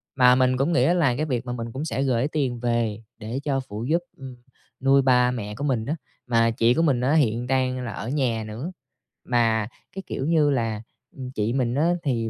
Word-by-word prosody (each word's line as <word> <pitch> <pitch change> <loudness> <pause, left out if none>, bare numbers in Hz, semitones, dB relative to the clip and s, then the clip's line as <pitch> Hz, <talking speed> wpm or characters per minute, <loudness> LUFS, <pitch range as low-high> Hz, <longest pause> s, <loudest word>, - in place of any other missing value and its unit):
Mà 125 -2 +6
mình 130 0 +2
cũng 145 +6 +1
nghĩ 165 - +3
đó 170 - +3
là 155 -9 +2
cái 150 +5 -1
việc 125 -4 -2
mà 125 - -3
mình 115 -1 -5
cũng 140 +4 -4
sẽ 135 -3 -1
gửi 130 0 +1
tiền 135 -6 -2
về, 115 -2 -1 0.2
để 115 +4 -4
cho 135 -2 0
phụ 105 +3 -5
giúp, 170 +2 +2 0.2
ừm, 130 -2 -9 0.4
nuôi 135 +1 +4
ba 125 -1 +4
mẹ 105 -4 -5
của 140 - -5
mình 125 -6 0
á, 150 +4 -1 0.3
mà 115 -1 +3
chị 115 +1 +3
của 165 - +1
mình 140 -7 +2
á 135 +4 +2
hiện 120 -5 +2
đang 130 -1 0
là 115 - -4
ở 110 +3 -6
nhà 125 -6 0
nữa. 120 +11 -6 0.5
Mà 115 -3 +2 0.3
cái 195 - -5
kiểu 135 - -3
như 155 -2 +3
là, 115 -5 -1 0.3
ừm, 130 -2 -7
chị 110 -1 -1
mình 125 -2 0
á 165 +5 +2
thì 115 -5 -1
125 Hz, 230 wpm, -24 LUFS, 115-140 Hz, 0.5 s, Mà